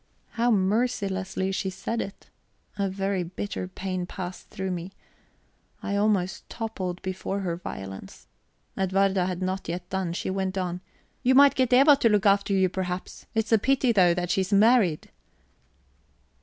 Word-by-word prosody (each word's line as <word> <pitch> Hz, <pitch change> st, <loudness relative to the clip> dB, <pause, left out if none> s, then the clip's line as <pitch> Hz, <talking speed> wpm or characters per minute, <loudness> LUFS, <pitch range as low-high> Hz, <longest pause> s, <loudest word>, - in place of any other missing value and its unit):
How 235 Hz, +1 st, +1 dB
mercilessly 195 Hz, -3 st, 0 dB
she 190 Hz, 0 st, -2 dB
said 195 Hz, +5 st, -3 dB
it! 195 Hz, -, -9 dB, 0.4 s
A 200 Hz, -1 st, -1 dB
very 195 Hz, 0 st, -1 dB
bitter 185 Hz, +2 st, -5 dB
pain 185 Hz, -1 st, -4 dB
passed 180 Hz, 0 st, -7 dB
through 190 Hz, -1 st, -4 dB
me. 180 Hz, +2 st, -5 dB, 0.9 s
I 200 Hz, -, -2 dB
almost 200 Hz, -3 st, 0 dB
toppled 190 Hz, -6 st, -4 dB
before 190 Hz, +1 st, -3 dB
her 175 Hz, -3 st, -2 dB
violence. 95 Hz, -, -8 dB, 0.5 s
Edwarda 190 Hz, -1 st, +1 dB
had 185 Hz, 0 st, -3 dB
not 185 Hz, -1 st, -3 dB
yet 180 Hz, +1 st, -4 dB
done; 190 Hz, -3 st, -1 dB
she 185 Hz, -, -3 dB
went 190 Hz, 0 st, -2 dB
on: 180 Hz, -1 st, -2 dB, 0.4 s
"You 260 Hz, 0 st, +3 dB
might 280 Hz, +1 st, +7 dB
get 255 Hz, -2 st, +1 dB
Eva 275 Hz, +4 st, +7 dB
to 235 Hz, -, +3 dB
look 210 Hz, -2 st, +2 dB
after 200 Hz, 0 st, +3 dB
you, 190 Hz, -1 st, +3 dB
perhaps. 180 Hz, 0 st, -5 dB
It's 220 Hz, 0 st, 0 dB
a 225 Hz, -, +5 dB
pity 260 Hz, +1 st, +2 dB
though, 180 Hz, -5 st, +4 dB
that 180 Hz, 0 st, -2 dB
she's 190 Hz, +1 st, 0 dB
married." 205 Hz, -5 st, +3 dB
190 Hz, 155 wpm, -26 LUFS, 185-210 Hz, 0.9 s, might